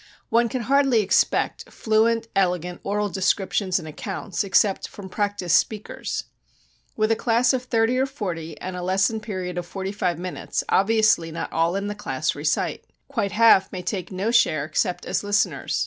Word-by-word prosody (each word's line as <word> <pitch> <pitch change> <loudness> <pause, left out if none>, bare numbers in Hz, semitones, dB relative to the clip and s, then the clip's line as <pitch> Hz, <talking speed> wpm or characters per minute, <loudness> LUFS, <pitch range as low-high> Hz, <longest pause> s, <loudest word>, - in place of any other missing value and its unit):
One 235 0 +3
can 255 -1 -3
hardly 270 -1 +3
expect 200 - +1
fluent, 225 +1 +1
elegant 180 -2 0
oral 205 +1 0
descriptions 190 0 0
and 165 -4 -6
accounts 170 +5 -4
except 195 0 +2
from 195 -2 -10
practiced 200 -3 +2
speakers. 215 -1 -4 0.7
With 215 0 +2
a - - +4
class 240 +2 +2
of 260 - 0
thirty 235 +1 +1
or 265 - +2
forty 170 - -5
and 185 0 -5
a 180 - -5
lesson 195 +5 +1
period 185 -5 -4
of 175 - -7
forty 195 +1 -4
five 185 -5 -1
minutes 180 +1 -4
obviously 215 -5 +3
not 160 - -5
all 165 +2 +1
in 200 0 -2
the 205 - -3
class 155 -8 -2
recite; 150 +1 -1 0.3
quite 225 -8 -2
half 220 -4 +5
may 180 -1 -6
take 185 0 -4
no 195 +5 -1
share 155 -11 +3
except 160 +3 -1
as - - -1
listeners. 205 0 0
200 Hz, 170 wpm, -24 LUFS, 180-225 Hz, 0.7 s, half